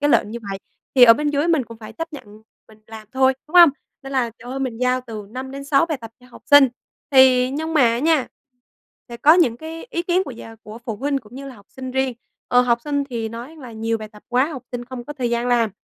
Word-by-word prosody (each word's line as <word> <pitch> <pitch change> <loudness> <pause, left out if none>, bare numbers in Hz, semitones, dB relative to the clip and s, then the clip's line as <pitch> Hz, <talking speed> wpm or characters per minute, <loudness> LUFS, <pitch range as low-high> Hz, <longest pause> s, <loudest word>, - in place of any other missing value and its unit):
cái 290 +1 +2
lệnh 210 - +3
như 235 - -5
vậy. 195 - -4 0.4
Thì 255 - +9
ở 230 -1 +8
bên 295 +3 -1
dưới 295 +3 0
mình 310 -7 +2
cũng 230 -1 -12
phải 220 0 -10
chấp 330 +7 -6
nhận 215 -6 -12 0.3
mình 220 -1 -18
làm 220 -1 -11
thôi, 265 0 +3
đúng 330 - -15
hông? 345 -1 +10 0.3
Nên 270 0 -8
là 245 -3 0
trời 245 +2 -10
ơi, 270 +1 -4
mình 245 -4 -3
giao 250 0 +1
từ 215 -3 -7
5-6 275 +4 -1
bài 310 -5 -3
tập 225 -1 -9
cho 250 - -18
học - - -15
sinh, 285 -2 +7 0.4
thì 260 -2 +5
nhưng 320 +4 -3
mà 235 -5 +4
nha, 310 -1 +2 0.8
sẽ 235 - -8
có 305 +6 +6
những 270 -10 +3
cái 320 - -8
ý 340 -8 -2
kiến 360 +2 +1
của - - -7
gia 225 -2 -11
của 215 +1 -11
phụ 225 -3 -4
huynh, 280 +4 -1
cũng 230 -1 -17
như 275 +1 -8
là 260 - -10
học 205 -3 -18
sinh 260 -1 -7
riêng. 265 -1 -1 0.3
Ờ, 245 - +5
học 240 -1 +1
sinh 285 -1 -1
thì 230 -2 -3
nói 240 +8 -9
là 255 -6 -10
nhiều 225 0 -2
bài 215 - -8
tập 210 -1 -17
quá, 250 +2 +2
học 265 - -7
sinh 245 0 -4
không 250 -1 -8
có 295 - -7
thời 255 -5 -3
gian 235 +1 -1
làm. 230 -3 +2
255 Hz, 260 wpm, -21 LUFS, 230-285 Hz, 0.8 s, hông